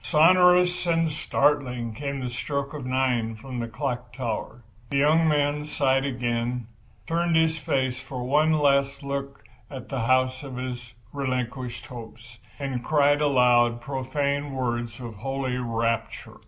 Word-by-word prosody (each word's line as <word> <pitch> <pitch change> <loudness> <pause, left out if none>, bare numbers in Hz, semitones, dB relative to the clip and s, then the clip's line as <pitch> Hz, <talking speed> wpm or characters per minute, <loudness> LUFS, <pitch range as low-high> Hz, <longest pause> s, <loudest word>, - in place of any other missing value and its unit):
Sonorous 180 +2 +5
and 165 -1 +2
startling 140 -6 0
came 140 +3 -4
the 125 - -3
stroke 140 +3 -3
of 140 -4 -6
9 125 -3 0
from 125 +2 -7
the 115 - -2
clock 125 0 -4
tower. 120 -1 -4 0.3
The 140 - 0
young 155 +3 +4
man 150 -1 +1
sighed 135 -3 +1
again, 120 -2 -2 0.4
turned 170 0 +1
his 160 0 +3
face 130 -3 -1
for 130 -1 -6
one 150 +5 +3
last 140 -2 +2
look 140 0 -5 0.3
at 130 -3 -8
the 135 - -2
house 130 +2 +2
of 135 -3 -8
his 125 -2 -6 0.2
relinquished 125 -3 -3
hopes—and 120 +2 -8
cried 145 0 +3
aloud 125 -4 +4
profane 140 +2 -2
words 120 -3 -2
of 115 -4 -8
holy 135 +2 -2
rapture. 115 -2 -2
130 Hz, 140 wpm, -25 LUFS, 120-145 Hz, 0.4 s, Sonorous